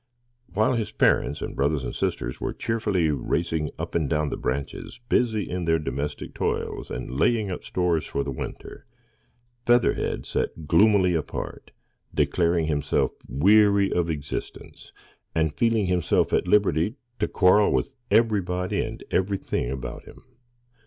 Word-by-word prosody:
While 110 +7 +2
his 115 -3 -2
parents - - +2
and - - -5
brothers 70 0 0
and - - -4
sisters - - -3
were - - -2
cheerfully 105 -8 0
racing 80 +1 -1
up - - -5
and 80 -5 0
down 75 -1 +1
the - - -3
branches, 70 - -4
busy 110 -4 +1
in 90 -1 -3
their 80 0 +3
domestic 75 0 -4
toils, - - -2
and 65 +3 -5
laying 110 -5 +2
up 90 - -5
stores 90 -3 0
for 70 - -2
the 70 - -4
winter, 65 - -8 0.8
Featherhead 120 0 +2
sat 80 - -3
gloomily 95 +1 +4
apart, 80 -2 -4 0.5
declaring 85 -2 +2
himself 75 -2 0 0.2
weary 100 +5 +4
of 85 -1 0
existence, 75 -3 -6 0.4
and 80 -2 +1
feeling 115 -1 +2
himself 90 -2 +1
at - - +2
liberty 100 - +2 0.2
to - - +1
quarrel 100 +2 +4
with 140 - 0 0.2
everybody 95 -5 +1
and - - -5
everything 95 -9 -1
about 65 0 -6
him. - - -14
90 Hz, 140 wpm, -25 LUFS, 75-105 Hz, 0.8 s, gloomily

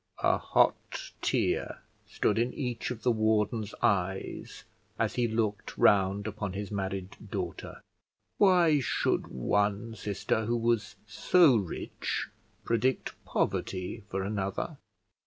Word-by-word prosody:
A - - +3
hot - - +1
tear - - 0 0.3
stood 105 - +1
in 120 +2 +1
each 125 -5 -3
of 120 -3 -6
the 125 - +4
warden's 110 -1 +1
eyes 95 -1 -1 0.3
as - - 0
he 120 -1 +1
looked 110 -2 -2
round 100 0 +4
upon 100 -3 -4
his 100 0 -5
married 95 -1 -3
daughter. - - -5 0.6
Why 175 -6 +5
should 130 - 0
one 100 - 0
sister 110 +1 -1
who 120 +2 +1
was 115 -3 0
so 170 -8 +5
rich 100 -7 -3 0.4
predict 120 +3 0
poverty 95 +2 -2
for 95 0 -2
another? 100 -1 -3
105 Hz, 120 wpm, -29 LUFS, 100-120 Hz, 0.6 s, Why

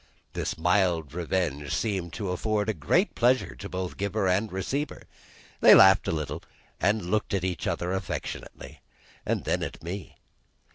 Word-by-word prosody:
This - - -3
mild 85 -3 +1
revenge 85 -5 -2
seemed 95 -6 -1
to 100 -4 -3
afford 105 +1 -1
great 175 - +2
pleasure 125 +2 +2
to 100 - -8
both 90 -1 -4
giver 100 0 -1
and 100 +4 +1
receiver. 130 - -3 0.6
They - - +9
laughed 95 0 +7
a - - +1
little, 75 -3 -3 0.4
and 105 -2 +1
looked 105 -1 0
at 95 - -1
each 90 -2 -2
other 90 +1 -1
affectionately, 95 -2 -6 0.5
and - - 0
then - - 0
at - - -6
me. 90 +2 -6
95 Hz, 150 wpm, -27 LUFS, 85-105 Hz, 0.6 s, They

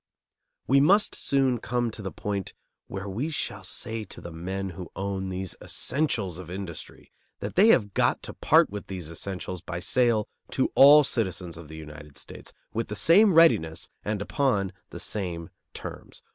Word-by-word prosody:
We 135 +1 +4
must 200 +9 +4
soon 135 -3 +1
come 120 +1 -1
to 110 - -9
the 95 -2 -5
point 100 -2 -4 0.3
where 95 +1 -6
we 115 +11 -2
shall 100 -10 -3
say 110 +4 -3
to - - -11
the 85 - -8
men 95 +4 -4
who 90 -2 -8
own 95 0 -3
these 95 -1 -4
essentials 110 - -1
of 90 -2 -9
industry 90 -3 -8 0.3
that - - -5
they 200 +5 +6
have 105 - +4
got - - +1
to - - -6
part - - +4
with 105 0 -6
these 90 -4 -6
essentials 90 +1 -5
by 85 -1 -5
sale 115 +2 +2 0.3
to 130 - +1
all 145 +2 +9
citizens 95 - -1
of 80 -1 -10
the 80 +1 -10
United 75 -2 -11
States - - -9 0.2
with 115 +1 -2
the 105 - -5
same 190 - +5
readiness 85 - +4
and 105 -1 -2
upon 105 -8 0 0.2
the - - -8
same 85 -5 -3 0.2
terms. - - -9
100 Hz, 175 wpm, -27 LUFS, 90-125 Hz, 0.3 s, all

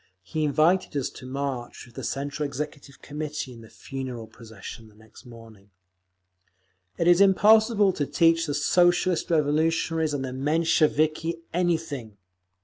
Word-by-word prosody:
He 155 - -2
invited 155 +3 +2
us 135 - -2
to 130 - -11
march 135 -2 -5
with 120 - -19
the - - -8
Central 140 +2 -3
Executive 145 0 -6
Committee 150 -3 -5
in 115 - -13
the 110 - -14
funeral 130 -4 -7
procession 110 0 -12
next 110 +4 -17
morning…. 115 -4 -15 1.3
"It 170 - 0
is 175 +2 +6
impossible 210 +1 +5
to 145 -4 -2
teach 165 -1 +3
the 145 - -2
Socialist 175 +3 +2
Revolutionaries 160 0 +1
and 135 -2 -3
the 130 - -6
Mensheviki 155 +2 +1
anything!" 160 - -2
150 Hz, 135 wpm, -25 LUFS, 130-165 Hz, 1.3 s, is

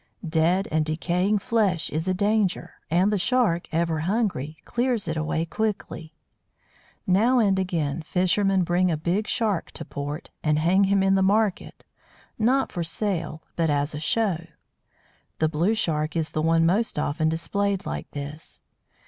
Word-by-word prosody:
Dead 165 +5 +2
and 155 0 +2
decaying 175 +6 0
flesh 205 -6 0
is 160 +4 -2
a 185 - +2
danger, 205 -1 0 0.2
and 185 +5 +3
the 205 - +1
Shark, 210 -6 +1
ever 165 -1 0
hungry, 170 - -1
clears 240 -5 0
it 160 - -2
away 160 +1 -1
quickly. 170 -4 -4 0.9
Now 220 +8 +3
and 200 -5 +3
again 170 -5 -1
fishermen 185 +3 +1
bring 175 +2 +2
a 160 - 0
big 180 +7 -1
Shark 210 -6 0
to - - -7
port, 145 +2 -6
and 150 -1 +2
hang 180 +5 +3
him 195 0 +2
in 195 0 +3
the 195 - +3
market 205 +1 0 0.5
not 260 +5 +2
for 175 - -3
sale, 165 -3 -2
but 165 -2 +1
as 145 +1 0
a 150 - -4
"show." 170 0 0 0.9
The 155 - +1
Blue 170 +8 +1
Shark 155 -7 -1
is 160 -1 -1
the 155 - -1
one 165 +1 +3
most 200 +5 +1
often 155 +2 0
displayed 195 +4 -1
like - - -5
this. 145 +2 -8
175 Hz, 155 wpm, -25 LUFS, 160-200 Hz, 0.9 s, and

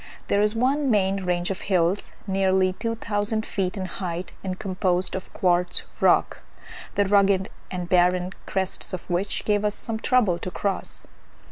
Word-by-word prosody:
There 200 - +3
is 210 +1 +2
one 270 +4 +2
main 195 -3 +2
range 175 +1 0
of 190 - -5
hills, 185 0 +1
nearly 190 -1 +2
two 230 +3 -3
thousand 215 0 -1
feet 185 -1 -2
in 190 - -2
height, 180 -1 -5
and 185 -1 -3
composed 185 -2 0
of 190 - -5
quartz 180 -1 +2 0.2
rock, - - +3 0.6
the 205 - +3
rugged 195 -1 +3 0.2
and 180 -2 -4
barren 180 +1 +3
crests 190 0 -2
of 180 - -5
which 185 +3 -1
gave 205 -1 +2
us 210 0 +1
some 225 -1 -4
trouble 220 -9 +3
to - - -4
cross. 195 +1 0
190 Hz, 160 wpm, -25 LUFS, 180-205 Hz, 0.6 s, There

